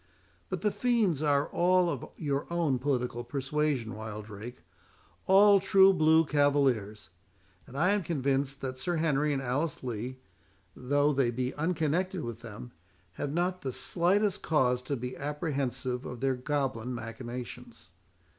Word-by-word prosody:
But -, -, -3 dB
the 210 Hz, -, +1 dB
fiends 205 Hz, -, +1 dB
are 145 Hz, -1 st, +2 dB
all 180 Hz, +1 st, +3 dB
of 170 Hz, -, -4 dB
your 140 Hz, -2 st, -2 dB
own 160 Hz, -7 st, +1 dB
political 125 Hz, -3 st, -1 dB
persuasion, 135 Hz, -3 st, -1 dB
Wildrake, 110 Hz, +1 st, -8 dB, 0.6 s
all 200 Hz, +1 st, +7 dB
true 195 Hz, 0 st, +6 dB
blue 160 Hz, -1 st, +4 dB
cavaliers; 130 Hz, -, +1 dB, 0.6 s
and 130 Hz, -, -10 dB
I 180 Hz, +6 st, +3 dB
am 205 Hz, 0 st, +2 dB
convinced, 140 Hz, -4 st, -1 dB
that 130 Hz, -1 st, -5 dB
Sir 175 Hz, +5 st, -1 dB
Henry 150 Hz, -2 st, +1 dB
and 135 Hz, -1 st, -1 dB
Alice 135 Hz, +4 st, -2 dB
Lee, 125 Hz, +1 st, -4 dB, 0.6 s
though 145 Hz, +3 st, +1 dB
they 135 Hz, -3 st, +2 dB
be 125 Hz, +2 st, -2 dB
unconnected 165 Hz, +3 st, -1 dB
with 120 Hz, -1 st, -5 dB
them, 120 Hz, +2 st, -9 dB, 0.4 s
have 140 Hz, +10 st, -4 dB
not 180 Hz, +3 st, -1 dB
the 130 Hz, -, -3 dB
slightest 190 Hz, -, 0 dB
cause 125 Hz, -5 st, +2 dB
to 135 Hz, +3 st, -3 dB
be 125 Hz, +2 st, -5 dB
apprehensive 135 Hz, -4 st, -3 dB
of 125 Hz, -, -7 dB
their 135 Hz, +1 st, +1 dB
goblin 130 Hz, -2 st, -2 dB
machinations. 120 Hz, -5 st, -8 dB
140 Hz, 140 wpm, -29 LUFS, 125-160 Hz, 0.6 s, all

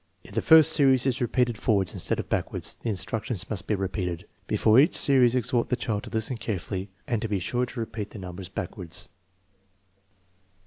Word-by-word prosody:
If -, -, -14 dB
the -, -, 0 dB
first 160 Hz, 0 st, +7 dB
series 135 Hz, -4 st, +4 dB
is 130 Hz, -2 st, 0 dB
repeated 120 Hz, -2 st, 0 dB
forwards 100 Hz, -5 st, +1 dB
instead -, -, -2 dB
of -, -, -4 dB
back -, -, -1 dB
wards, -, -, 0 dB
the 115 Hz, -, -6 dB
instructions 110 Hz, 0 st, -3 dB
must 100 Hz, -4 st, -3 dB
be 105 Hz, -, +1 dB
repeated. 95 Hz, -3 st, -3 dB, 0.2 s
Before 110 Hz, +3 st, +4 dB
each 150 Hz, -, +4 dB
series 130 Hz, -3 st, +4 dB
exhort 125 Hz, -1 st, 0 dB
the 125 Hz, -, +2 dB
child 110 Hz, -4 st, -3 dB
to -, -, -8 dB
listen 115 Hz, +3 st, -2 dB
carefully 95 Hz, -2 st, -4 dB, 0.2 s
and 120 Hz, -5 st, -1 dB
to 115 Hz, -, -2 dB
be 105 Hz, -, 0 dB
sure 125 Hz, +7 st, -1 dB
to 125 Hz, -, -8 dB
repeat 110 Hz, -2 st, -4 dB
the -, -, -11 dB
numbers 90 Hz, -1 st, -8 dB
backwards. 90 Hz, -2 st, -4 dB
110 Hz, 190 wpm, -26 LUFS, 95-125 Hz, 0.2 s, first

